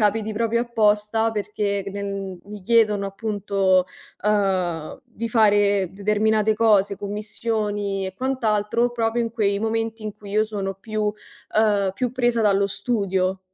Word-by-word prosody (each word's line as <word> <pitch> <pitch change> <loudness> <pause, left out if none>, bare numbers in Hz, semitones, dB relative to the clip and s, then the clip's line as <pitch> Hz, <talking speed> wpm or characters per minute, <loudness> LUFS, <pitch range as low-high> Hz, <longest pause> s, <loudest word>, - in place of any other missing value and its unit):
capiti 215 +1 +1
proprio 230 +2 0
apposta 220 -1 +1
perché 205 -1 -2
c 195 - -5
nel 195 -2 -5
mi 205 -1 -10
chiedono, 210 -2 +3
appunto, 195 -2 +1 0.4
uhm, 185 -6 0
di 230 -1 -6
fare 205 -4 +3
determinate 210 +2 +1
cose, 205 -3 +3
commissioni 205 -1 -2
e 190 - -7
quant'altro, 235 -2 0
proprio 230 0 0
in 230 -1 -1
quei 200 -3 0
momenti 225 0 -2
in 215 -1 -5
cui 205 -1 -11
io 215 +1 +2
sono 200 -3 -3
più 215 +3 -5
uhm, 210 -1 -1
più 250 +3 -1
presa 240 -2 +1
dallo 200 -2 +3
studio. 190 -3 -1
210 Hz, 135 wpm, -23 LUFS, 200-225 Hz, 0.4 s, chiedono